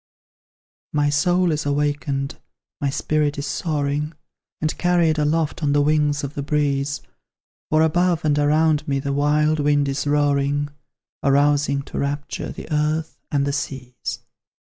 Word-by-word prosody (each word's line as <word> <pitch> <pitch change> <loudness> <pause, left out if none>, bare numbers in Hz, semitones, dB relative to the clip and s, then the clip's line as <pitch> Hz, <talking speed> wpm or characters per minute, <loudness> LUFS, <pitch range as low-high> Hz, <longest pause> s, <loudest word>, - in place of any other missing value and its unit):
My 145 -1 +2
soul 175 +4 +2
is 150 0 -1
awakened, 145 -1 -1 0.4
my 140 - +1
spirit 145 +1 0
is 140 - -3
soaring 150 0 -1 0.5
And 155 0 -1
carried 170 -3 +3
aloft 155 +1 0
on 145 -2 +1
the 145 - +4
wings 150 0 +2
of 140 +1 -4
the 145 - -3
breeze; 140 -1 0 0.7
For 155 +1 +4
above 170 +1 +2
and 150 -1 +2
around 155 +1 +2
me 140 -1 +1
the 140 +1 -2
wild 150 +2 +2
wind 145 -1 +2
is 140 +1 -2
roaring, 145 0 +1 0.5
Arousing 140 0 +2
to - - -6
rapture 145 +1 -3
the - - -9
earth 155 +1 -1
and 140 -2 +1
the 140 - -1
seas. 130 -3 -5
145 Hz, 145 wpm, -22 LUFS, 140-155 Hz, 0.7 s, the